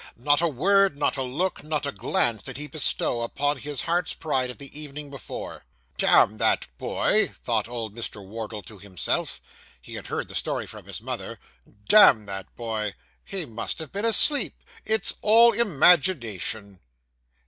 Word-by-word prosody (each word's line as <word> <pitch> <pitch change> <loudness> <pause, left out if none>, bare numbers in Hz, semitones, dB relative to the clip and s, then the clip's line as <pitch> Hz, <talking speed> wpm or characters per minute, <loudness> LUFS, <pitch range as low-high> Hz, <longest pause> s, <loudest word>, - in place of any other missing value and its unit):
Not 145 +5 +2
a 170 - +2
word, 190 +3 +2
not 145 - 0
a 135 - -3
look, 145 +8 -3
not 150 -1 -2
a 140 - -2
glance, 115 -4 0
did 135 -1 -8
he 150 - -4
bestow 140 -4 0
upon 145 +5 -1
his 145 -1 -1
heart's 175 +1 -1
pride 130 -5 -1
of 125 - -7
the 140 -1 -8
evening 145 -1 -8
before. 135 -5 -8 0.4
'Damn 110 +2 +4
that - - +2
boy!' - - +2 0.2
thought - - 0
old 115 -3 -6
Mr. 110 -4 -6
Wardle 110 0 -7
to 105 +3 -12
himself. 95 -2 -3 0.4
He - - -13
had - - -7
heard - - -4
the - - -11
story - - -2
from - - -12
his - - -7
mother. - - -5 0.5
'Damn 135 - +7
that 95 -1 -8
boy! 110 -3 -4 0.3
He 195 -5 -3
must 115 -3 -2
have 160 -3 -7
been 200 +4 -3
asleep. 230 +6 +4 0.2
It's 220 -2 +2
all 230 +2 +6
imagination. 135 - +2
140 Hz, 165 wpm, -25 LUFS, 110-170 Hz, 0.5 s, Damn